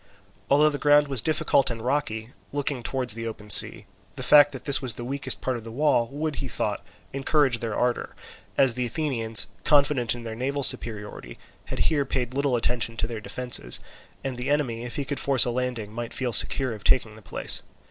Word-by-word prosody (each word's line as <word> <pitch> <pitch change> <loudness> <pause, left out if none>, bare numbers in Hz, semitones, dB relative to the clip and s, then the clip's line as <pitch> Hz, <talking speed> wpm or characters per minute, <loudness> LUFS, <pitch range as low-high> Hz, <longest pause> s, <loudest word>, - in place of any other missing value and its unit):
Although 150 +2 +4
the 145 - -5
ground 145 0 +4
was 135 -5 +2
difficult 150 -3 +1
and 115 -1 -5
rocky, 120 -5 -2 0.2
looking 145 -2 -2
towards 125 -1 0
the 115 +1 -6
open 105 -2 -7
sea, - - +5 0.3
the - - -5
fact 145 -1 +6
that 130 -2 -9
this 140 -1 +4
was 125 -5 -1
the 120 - -7
weakest 135 +2 -1
part 130 -2 -2
of 115 - -10
the 115 - -9
wall 125 -2 +1
would, 150 +3 -4
he 135 - -4
thought, 105 - -3 0.3
encourage 135 -2 +1
their 115 -3 -4
ardour, 125 0 -2 0.4
as 135 -3 +4
the 125 +1 -2
Athenians, 115 -5 0 0.2
confident 140 -6 +2
in 120 - -9
their 115 -1 -6
naval 135 +5 -3
superiority, 105 - -1 0.3
had - - -6
here 150 -3 +1
paid 125 -2 -3
little 140 -1 0
attention 115 -1 -1
to - - -1
their 115 -2 -6
defences, 125 - 0 0.4
and 130 -2 -4
the 125 +3 -3
enemy 130 -6 -1
if 120 - -7
he 140 - -3
could 140 +1 -4
force 135 -4 +4
a 120 - -1
landing 120 -4 -4
might 120 0 -6
feel 125 -2 -2
secure 130 +3 +5
of 105 -2 -10
taking 115 -4 +2
the 110 - -14
place. - - 0
125 Hz, 205 wpm, -25 LUFS, 115-140 Hz, 0.4 s, fact